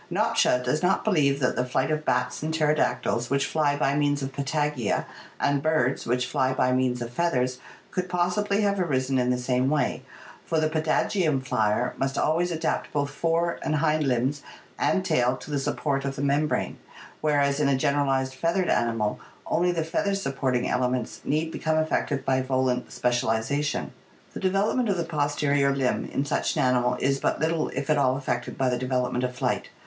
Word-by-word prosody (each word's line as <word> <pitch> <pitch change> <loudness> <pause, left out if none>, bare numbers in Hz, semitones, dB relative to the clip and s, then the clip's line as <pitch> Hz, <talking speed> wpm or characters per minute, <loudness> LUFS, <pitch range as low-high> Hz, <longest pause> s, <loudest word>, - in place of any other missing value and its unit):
Nopcsa 125 0 +2
does 125 +5 0
not 180 +1 +2
believe 145 -9 +2
that 130 - +1
the 125 - +1
flight 130 +3 -1
of 155 0 -1
bats 125 -3 0
and 155 +1 -2
pterodactyls, 150 -6 0
which 140 0 +1
fly 150 -2 +1
by 140 -1 +1
means 145 -1 +1
of 135 0 -4
patagia, 145 -4 -1 0.3
and 140 -1 +1
birds, 145 -4 +1
which 125 +1 +1
fly 130 0 0
by 130 -1 +1
means 125 -1 +1
of 120 - -7
feathers, 130 -6 0 0.3
could 180 0 -2
possibly 185 +4 +1
have 200 -1 +1
arisen 135 -6 0
in 125 0 +1
the 125 - +2
same 125 +1 0
way, 150 -1 0 0.4
for 160 - 0
the 155 0 +1
patagium 155 0 +1
flier 110 -2 0
must 135 +1 -1
always 170 +3 +1
adapt 165 -2 -2
both 145 -1 -1
fore 165 +3 0
and 155 - -1
hind 155 0 +2
limbs 135 +2 0 0.4
and 190 -1 +1
tail 125 -5 +2
to 150 - -10
the 145 - 0
support 135 0 -1
of 135 0 -3
the 135 - -4
membrane, 145 +2 0 0.4
whereas 145 -2 +2
in 150 - +2
a 135 - +2
generalized 135 -2 +1
feathered 170 +6 0
animal 115 -3 0 0.3
only 180 +2 +1
the 165 -2 -1
feather 195 +5 -1
supporting 135 -8 -1
ele 125 0 +1
ments 125 -2 -3
need 155 +3 -1
become 160 -1 -1
affected 155 -3 0
by 130 -1 +2
volant 130 -1 0
specialization. 120 +4 0 0.4
The - - -6
de 185 - +1
velopment 210 +5 +1
of 195 - +1
the 170 - 0
posterior 145 -3 +1
limb 130 -2 0
in 140 - -1
such - - -1
an - - +1
animal 125 -1 +2
is 135 +1 +1
but - - 0
little 160 +1 0
if 140 +1 -4
at 150 - +3
all 130 -1 +2
affected 125 -3 -3
by 130 - +1
the 125 -1 -1
development 125 -1 -1
of 125 0 -2
flight. - - -1
140 Hz, 190 wpm, -26 LUFS, 130-155 Hz, 0.4 s, at